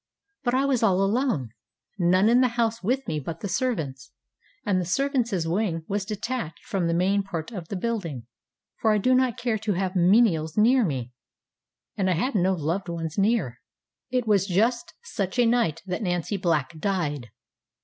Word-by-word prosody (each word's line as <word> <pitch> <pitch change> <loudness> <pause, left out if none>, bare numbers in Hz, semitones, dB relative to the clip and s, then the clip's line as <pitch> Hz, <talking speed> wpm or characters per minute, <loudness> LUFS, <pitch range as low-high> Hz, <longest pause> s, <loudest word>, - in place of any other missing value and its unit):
But 245 -1 +1
I 270 +1 +2
was 270 -4 +1
all 195 -4 +3
alone; 200 - 0 0.5
none 185 +3 +4
in 240 +2 +5
the 255 - +5
house 230 -1 +1
with 255 +7 -1
me 155 - -1
but 160 +4 -6
the - - -3
servants, 160 - -2 0.6
and 190 -3 +1
the - - -3
servantsŌĆÖ 240 - 0
wing 175 -5 -1
was 200 -1 -2
detached 220 -3 -4
from 185 -4 -1
the 165 - +1
main 195 +3 +2
part 175 -2 -5
of 180 -7 -7
the 200 - -5
building, 180 - -3 0.5
for 220 - +3
I 215 - +3
do 255 +6 +2
not 255 -2 +2
care 240 -3 -1
to 215 -1 -1
have 185 +1 -2
menials 175 -4 +3
near 245 +4 +5
me, 130 - -3 0.8
and 190 -2 0
I - - +3
had 250 +12 -1
no 190 -2 +2
loved 170 +3 -2
ones 165 +1 -3
near. 195 - +1 0.5
It 250 -1 0
was 200 -3 +2
just 225 +6 +1
such 200 - -3
a 245 - +4
night 230 -10 +1
that 180 +2 -3
Nancy 175 0 -1
Black 160 -6 -1
died. 150 - -2
195 Hz, 180 wpm, -25 LUFS, 170-235 Hz, 0.8 s, in